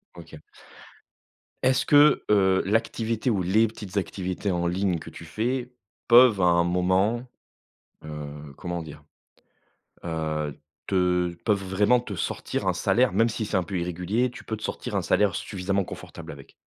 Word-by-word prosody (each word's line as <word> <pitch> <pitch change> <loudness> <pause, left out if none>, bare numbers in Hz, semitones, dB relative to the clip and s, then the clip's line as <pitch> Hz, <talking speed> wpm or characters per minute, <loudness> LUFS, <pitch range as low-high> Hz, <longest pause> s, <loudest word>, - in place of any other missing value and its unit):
OK. 80 -3 -12 1.2
Est-ce 130 +1 +3
que, 145 0 +6
heu, 95 -2 +4
l'activité 115 +3 0
ou 100 -5 +1
les 105 +6 +3
petites 105 -3 -10
activités 95 0 -2
en 85 -1 0
ligne 90 -1 0
que - - -10
tu - - -11
fais 120 +8 -2 0.4
peuvent 120 -4 +7
à - - +2
un 85 -1 +4
moment, 95 +7 +1 0.8
heu, 75 -1 -8
comment 85 -1 -5
dire, 75 -1 -11 1.0
heu, 80 -3 -3 0.3
te 90 -2 +1
peuvent 100 -3 +1
vraiment 100 +6 +3
te 105 -4 -6
sortir 85 - -3
un - - +2
salaire? 125 -3 +2
Même 115 +4 +3
si 110 -1 -3
c'est 100 - -1
un 90 - +1
peu 95 +1 -4
irrégulier, 90 +8 -1
tu - - -11
peux 110 - -4
te 110 - -12
sortir - - -4
un - - 0
salaire 105 -2 +2
suffisamment 100 0 -2
confortable - - -9
avec? 70 -1 -13
95 Hz, 160 wpm, -25 LUFS, 85-110 Hz, 1.2 s, peuvent